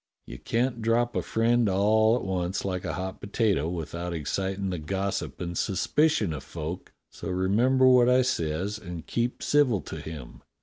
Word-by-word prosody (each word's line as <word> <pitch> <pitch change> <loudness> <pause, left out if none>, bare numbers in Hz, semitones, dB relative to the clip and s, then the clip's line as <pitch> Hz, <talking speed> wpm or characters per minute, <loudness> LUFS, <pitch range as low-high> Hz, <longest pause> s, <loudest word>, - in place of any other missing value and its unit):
You - - -9
can't 120 0 -1
drop 120 +2 +1
a - - +1
friend 115 0 +2
all 110 +4 +3
at 125 - -2
once 95 0 -2
like 95 -1 -3
a 85 - -2
hot 95 +5 -5
potato 100 -6 0
without 85 +1 -4
excitin' 95 +5 -2
the 90 - -3
gossip 95 +5 -3
and 85 0 -4
suspicion 110 - +1
of 70 -3 -6
folk; 80 +4 -6 0.2
so - - -7
remember 110 +9 +3
what 125 -1 +6
I 130 +1 +5
says 95 -1 -1
and 90 -5 -8
keep 120 +1 -2
civil 140 -8 +3
to - - -7
him. 80 -6 -9
95 Hz, 170 wpm, -27 LUFS, 85-120 Hz, 0.2 s, what